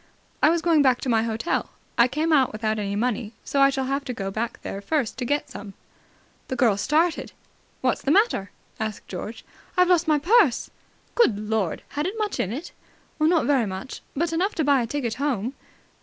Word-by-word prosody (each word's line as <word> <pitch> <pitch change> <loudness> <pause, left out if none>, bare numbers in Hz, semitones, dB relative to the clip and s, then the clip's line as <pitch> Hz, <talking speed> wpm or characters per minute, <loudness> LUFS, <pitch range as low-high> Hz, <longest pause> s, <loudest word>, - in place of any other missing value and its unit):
"I - - +6
was 335 0 +1
going 330 -3 +4
back 260 -3 +4
to 260 - -2
my 225 -2 +3
hotel. 225 +7 -1 0.3
I 235 - +5
came 315 +5 0
out 270 -4 +4
without 215 0 -1
any 200 -1 -2
money, 225 0 -1
so 280 - 0
I 275 - +7
shall 270 -1 -1
have 275 +2 -1
to 250 - -3
go 195 -1 -4
there 215 -2 -4
first 270 +1 -1
to 250 - -2
get 290 +4 -1
some." 200 -1 -9 0.7
The 260 - -3
girl 240 -5 +3
started. 315 - +1 0.5
"What's - - +1
the - - -2
matter?" 380 - +3 0.3
asked 220 -1 -4
George. 210 +5 -7 0.3
"I've 360 0 +5
lost 345 -2 +3
my 305 -1 +4
purse!" 355 - +3 0.4
"Good 245 - +3
Lord! 215 -5 -1
Had 295 +3 -2
it 405 +4 -4
much 425 -2 -2
in 190 - 0
it?" 285 +9 -6 0.5
"Not 320 +1 +3
very 265 -6 +2
much. 190 +7 -6
But 330 +3 0
enough 375 +6 0
to 320 - +1
buy 280 -2 +4
a 235 - -2
ticket 245 -3 -2
home." 255 -4 -1
265 Hz, 200 wpm, -24 LUFS, 220-315 Hz, 0.7 s, I